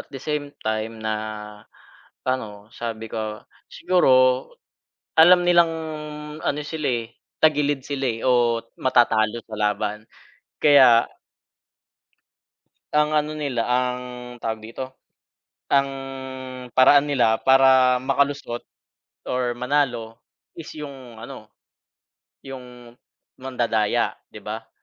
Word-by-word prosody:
at - - -12
the 140 - -9
same 145 +1 -4
time 110 +1 -2
na 110 0 -3 1.1
ano, 110 -5 -4
sabi 115 -1 -5
ko 110 -1 -5 0.2
siguro 180 -6 +1 1.1
alam 175 +3 +8
nilang 175 -2 +4 0.7
ano 145 - 0
sila, 155 +1 -5
eh, 115 -1 -3 0.3
tagilid 145 -2 +2
sila, 135 0 -4
eh, 115 -3 -2
o 120 -2 +2 0.2
matatalo 115 -3 +2
sa 110 - -6
laban 105 0 -1 0.5
kaya 130 -6 +6 1.9
ang 150 0 +3
ano 150 0 0
nila 140 -6 -2
ang 125 0 0 0.4
tawag 110 -1 -4
dito, 130 +4 -8 0.8
ang 140 0 +4 0.9
paraan 140 +3 +6
nila 120 -6 +2
para 130 -1 +5
makalusot 135 -1 -1 0.7
or 125 -1 0
manalo 120 -3 -1 0.4
is 165 -1 -9
yung 135 -7 -10
ano, 120 -2 -9 0.9
yung 125 -3 -11 0.4
mandadaya 120 -5 0 0.2
'di - - -10
ba. - - -7
125 Hz, 100 wpm, -23 LUFS, 115-145 Hz, 1.9 s, alam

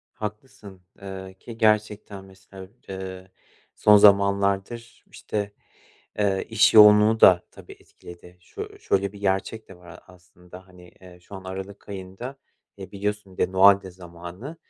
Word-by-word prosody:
Haklısın. 105 -2 -9 0.2
Eee, 95 -1 -9
ki 115 -1 -11
gerçekten, 105 -2 -1
mesela, 95 0 -14 0.2
eee, 95 -1 -8 0.4
son 105 0 +5
zamanlardır, 100 +3 +2
işte, 105 -1 -5 0.7
eee, 100 -2 0
iş 110 -1 +3
yoğunluğu 105 +1 +6
da 90 -2 +6
tabii - - -15
etkiledi. 90 +1 -16
Şö 85 - -10
şöyle 100 0 -1
bir 100 - -13
gerçek 100 +3 -3
de 95 - -14
var 90 0 -18
a 85 - -12
aslında 90 0 -17
hani: 90 -1 -18
Eee, 90 -1 -15
şu 90 - -15
an 95 -1 -10
aralık 95 +2 -9
ayında, 100 +7 -8 0.4
eee, 95 -2 -11
biliyorsun, 105 0 -5
bir - - +2
de - - -15
Noel 100 +1 +6
de 95 - -10
zamanı. 90 - -11
95 Hz, 145 wpm, -23 LUFS, 95-105 Hz, 0.7 s, yoğunluğu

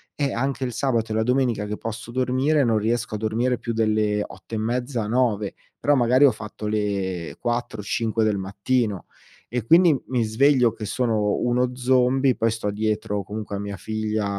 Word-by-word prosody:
Eh, 140 -3 -1
anche 135 +2 -1
il 125 - -4
sabato 115 -4 0
e - - -1
la 110 - +2
domenica 125 -3 +1
che 105 +1 -4
posso 115 +1 -6
dormire 130 +4 +2
non 115 -3 +2
riesco 115 +2 -1
a - - -2
dormire 115 +4 0
più 115 - -3
delle 110 -2 +1
8 115 - -9
e - - -1
mezza, 120 +1 -2
9. 110 -4 +1 0.3
Però 145 - +3
magari 130 +2 +5
ho 135 - +6
fatto 105 0 -8
le 100 -5 -2
4-5 115 -1 -1
del 105 -2 +1
mattino 100 +2 -1 0.4
e 120 -1 -3
quindi, 170 +2 +6
mhmm, 130 - -2
mi 125 -2 0
sveglio 125 +2 +3
che 105 - -7
sono 110 -2 0
uno 125 +1 +1
zombie. 130 +1 +3
Poi 115 - +1
sto 110 -2 -2
dietro 105 -1 -1
comunque 105 +1 -6
a - - -3
mia 100 -1 -5
figlia, 110 +1 -2
115 Hz, 185 wpm, -23 LUFS, 105-125 Hz, 0.4 s, ho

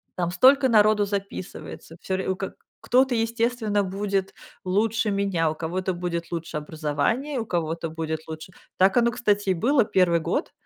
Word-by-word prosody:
там 175 -1 -1
столько 265 +9 +5
народу 215 -2 +4
записывается, 200 -4 -6
всё 190 0 -2
ре 190 - -3
у 190 - +1
ка 195 - -5 0.3
кто-то, 255 +1 +3
естественно, 225 -2 0
будет 195 0 -2 0.3
лучше 215 +3 +1
меня, 195 -5 +1
у 155 - -6
кого-то 180 +4 -2
будет 175 -1 -4
лучше 165 -2 -4
образование, 160 - -2
у 225 - -3
кого-то 165 -2 -2
будет 160 0 -4
лучше 160 +3 -8 0.3
так 190 +5 +4
оно, 235 0 +4
кстати, 205 -5 0
и - - +4
было 240 - +2
1 180 -4 +3
год. 160 - -2
195 Hz, 165 wpm, -25 LUFS, 170-225 Hz, 0.3 s, столько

